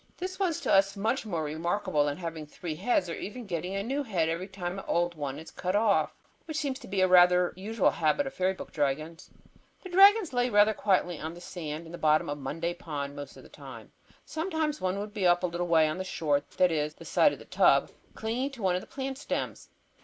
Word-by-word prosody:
This 370 +2 -5
was 360 -5 0
to - - +1
us 195 +1 +4
much 225 +3 -1
more 170 -6 -2
remarkable 165 +1 0
than 145 0 -2
having 165 -3 -6
three 160 +2 -6
heads 185 +2 +1
or 165 - -4
even 230 +7 -6
getting 180 0 -3
a 195 - -1
new 270 +6 -1
head 180 - 0
every 170 +3 -3
time 190 -1 -5
an - - -10
old 175 0 +1
one 145 -4 -4
is 160 +1 -10
cut 185 +1 -2
off, 210 -1 +2 0.3
which 315 -2 -5
seems 275 -4 -2
to 245 - -12
be 190 -1 +1
rather 180 -1 +6
a - - -14
usual 205 +3 +1
habit 165 - +1
of 270 - -5
fairy 185 +1 +1
book - - -9
dragons. 155 +3 -2 0.5
The 370 - -8
dragons 390 -1 +6
lay 245 0 +2
rather 210 0 +5
quietly 185 -5 +1
on 160 +2 -5
the - - -10
sand 165 -3 -6
at 165 - -11
the 175 - -8
bottom 155 -1 +3
of 145 0 -4
Monday 165 +5 -3
Pond 145 -5 -5
most 145 -2 -8
of - - -13
the - - -14
time. - - -11 0.3
Sometimes 315 -2 -2
one 185 +1 0
would 205 +1 -5
be 200 -4 +1
up 175 +1 +3
a - - +3
little 175 0 -2
way 160 -2 +4
on 155 +4 -3
the - - -2
shore, 150 -6 0 0.2
that 180 -1 +4
is, 150 -1 -1
the - - -13
side - - +4
of - - -6
the - - -13
tub, - - +4
or - - -18 0.2
clinging 235 +5 -2
to 235 -6 -9
one 185 -2 +3
of 180 - -1
the - - -13
plant 270 -1 -5
stems. - - -4
180 Hz, 245 wpm, -29 LUFS, 160-220 Hz, 0.5 s, rather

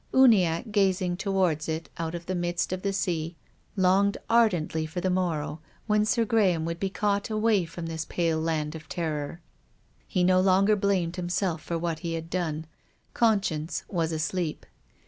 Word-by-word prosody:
Uniacke, 215 -6 +4
gazing 190 -3 +2
towards 180 -5 0
it 160 +1 -3
out 165 0 -2
of 170 0 -7
the 185 - -2
midst 175 0 -1
of 185 - -3
the 200 - 0
sea, 170 -4 -2 0.4
longed 195 +2 +3
ardently 180 -9 +3
for 160 +3 -4
the 185 +1 0
morrow 165 -4 -1 0.3
when 210 -1 +2
Sir 230 +1 +2
Graham 190 -7 +2
would 165 0 -3
be 195 - -1
caught 200 +1 0
away 215 -3 +2
from 165 +1 -7
this 160 -1 -3
pale 165 -2 0
land 155 -2 -1
of 160 -1 -10
terror. 160 -1 -3 0.7
He 180 - +1
no 185 +1 +4
longer 195 +2 +4
blamed 190 -4 0
himself 175 -2 -1
for 170 - -3
what 165 -1 -2
he 165 -1 -3
had 165 0 -6
done. 160 -3 -2 0.5
Conscience 195 -8 +1
was 165 -4 -1
asleep. 160 +1 -2
175 Hz, 165 wpm, -27 LUFS, 165-195 Hz, 0.7 s, Uniacke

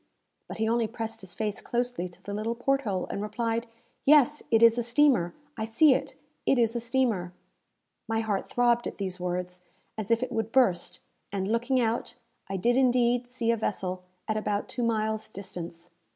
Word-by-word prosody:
But - - -7
he 220 0 0
only 230 0 +2
pressed 225 0 -5
his 180 -2 -7
face 210 -2 -2
closely 245 -6 -2
to 175 - -18
the 200 - -5
little 220 +3 -2
port 275 +3 +1
hole, 195 -7 -2
and 200 - -3
replied, 230 +2 -2 0.4
"Yes, 295 0 +5
it 225 0 +4
is 230 +1 +7
a - - +2
steamer! 240 -7 +3 0.2
I 220 - -2
see 260 +6 +5
it! - - -3 0.3
It 270 - +3
is 230 -1 +2
a - - +1
steamer!" 230 -7 0 0.7
My 225 0 0
heart 210 -3 -2
throbbed 240 -1 +2
at - - -7
these 190 -2 -4
words, 180 0 -3 0.4
as 215 -1 -4
if 230 +1 +3
it 255 - -4
would 225 0 -2
burst; 195 -10 +2 0.3
and, 195 -1 -2
looking 235 +4 +1
out, 230 0 -1 0.3
I 195 - -2
did 240 +6 +2
indeed 245 -1 +3
see 240 -2 0
a 230 - +1
vessel 185 -4 -2 0.3
at 215 - 0
about 210 -1 -1
two 245 - -4
miles' 220 -2 0
distance. 175 -4 -7
225 Hz, 190 wpm, -28 LUFS, 200-240 Hz, 0.7 s, is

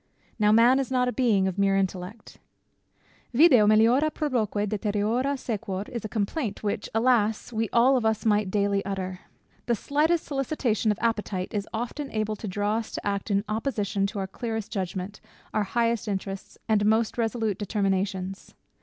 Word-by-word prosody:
Now, 210 0 +4
man 235 +4 +6
is 270 - -2
not 250 -1 +1
a - - +1
being 215 -7 +2
of 190 +1 -3
mere 195 0 +3
intellect. 190 +2 -4 1.0
Video 255 -7 +6
meliora 230 +8 +4
proboque, 220 -9 -1
deteriora 215 +6 0
sequor, 200 -6 -3
is 235 - -5
a 215 - -5
complaint 215 +1 -2
which, 205 - -2
alas! 225 -1 +2
we 220 -1 -1
all 250 +3 +5
of 250 - +1
us 220 0 0
might 210 -2 +2
daily 200 0 +1
utter. 185 -2 -4 0.5
The 240 - +2
slightest 305 +8 +1
solicitation 270 -6 -1
of 210 - -2
appetite 210 -5 -1
is 205 -1 -3
often 245 +5 -4
able 215 -2 -2
to 215 - -6
draw 205 +3 0
us 230 - -4
to - - -5
act 200 +1 -2
in 200 0 +1
opposition 215 -3 -1
to 210 - -7
our 195 - -1
clearest 225 +2 -5
judgment, 190 +1 -4 0.3
our 215 -1 +1
highest 230 +2 0
interests, 195 -1 -5
and 215 -2 +2
most 220 +1 +2
resolute 225 -3 -1
determinations. 195 -2 -2
215 Hz, 165 wpm, -26 LUFS, 200-235 Hz, 1.0 s, man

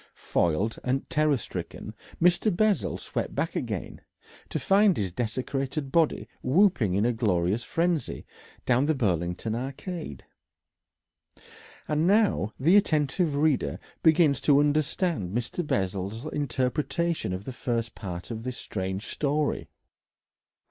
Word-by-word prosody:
Foiled 90 +7 0
and 130 +2 -1
terror 155 -3 +3
stricken, - - -6 0.3
Mr. 180 +5 +4
Bessel 215 -1 +2
swept - - -4
back - - -1
again, - - -4 0.5
to - - -2
find 200 -1 +4
his 95 -4 -1
desecrated 135 - -3
body 165 -1 +2
whooping 130 - +3
in 100 +3 +2
a 120 - +2
glorious 100 -2 +1
frenzy 170 +1 -1 0.4
down 125 +2 +3
the 155 - +2
Burlington 90 - -1
Arcade.... 135 - -5 1.6
And 155 +2 +1
now 200 - +3
the 165 +9 +5
attentive 155 -4 +2
reader 145 - +1 0.2
begins 160 -4 +4
to 145 -2 +5
understand 150 - 0
Mr. 125 +9 -3
Bessel's 100 +4 -2
interpretation 145 - -1
of 90 +1 -4
the 130 - -5
first 120 -1 -2
part 90 0 -7
of 110 -1 -4
this 125 +1 -5
strange 95 +1 -4
story. 150 0 -1
135 Hz, 120 wpm, -27 LUFS, 110-160 Hz, 1.6 s, the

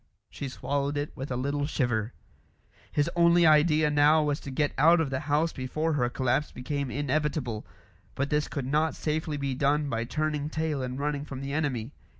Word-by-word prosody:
She 140 - -5
swallowed 140 +2 -2
it 145 +1 -3
with 135 +2 -6
a 125 - -2
little 140 +3 -1
shiver. 120 -6 -1 0.8
His 145 -1 +1
only 170 0 +5
idea 155 0 +4
now 150 +2 +5
was 145 -1 0
to - - -8
get 145 +2 0
out 165 +4 +5
of 155 -4 -1
the 130 - -1
house 155 +3 +2
before 155 +5 -2
her 125 -4 +1
collapse 130 +3 0
became 140 +1 -3
inevitable; 145 -4 -2 0.5
but 140 +2 -2
this 150 -1 +1
could 140 -3 -4
not 155 +4 +1
safely 155 0 -2
be 140 -1 -2
done 145 +2 +1
by 115 0 -1
turning 150 +2 -2
tail 155 -3 -2
and 125 0 -4
running 145 0 -2
from 135 -3 -7
the 140 0 -4
enemy. 140 -6 -1
145 Hz, 185 wpm, -28 LUFS, 130-150 Hz, 0.8 s, only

